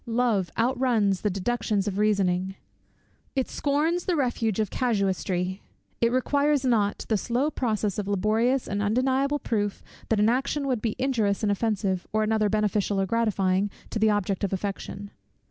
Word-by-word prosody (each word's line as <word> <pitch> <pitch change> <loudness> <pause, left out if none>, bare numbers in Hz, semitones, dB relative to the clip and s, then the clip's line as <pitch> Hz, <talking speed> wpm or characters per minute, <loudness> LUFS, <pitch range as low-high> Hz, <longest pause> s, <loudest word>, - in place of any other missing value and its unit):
Love 225 -6 +1
outruns 230 -5 +2
the 210 - +1
deductions 205 +1 -1
of 200 0 -2
reasoning; 190 -3 +1 0.8
it 265 -2 0
scorns 310 +5 0
the 360 - +1
refuge 235 - 0
of 215 -3 0
casuistry; 190 -5 -1 0.4
it 235 0 +3
requires 285 +2 +1
not 215 -5 +1
the 220 - +1
slow 245 +8 0
process 215 -7 -1
of 200 - -3
laborious 220 +6 +1
and 200 0 -2
undeniable 260 +6 +1
proof 205 -7 -2 0.3
that 220 - +2
an 210 - +4
action 275 +4 0
would 255 -5 0
be 225 -3 -1
injurious 225 -7 0
and 205 - +2
offensive, 200 -3 -1
or 215 0 +1
another 215 -1 +1
beneficial 210 -1 +1
or 195 - +2
gratifying, 200 -2 +1 0.2
to 220 - -2
the 220 0 +4
object 205 -2 0
of 200 - 0
affection. 200 +1 -4
215 Hz, 160 wpm, -26 LUFS, 200-250 Hz, 0.8 s, an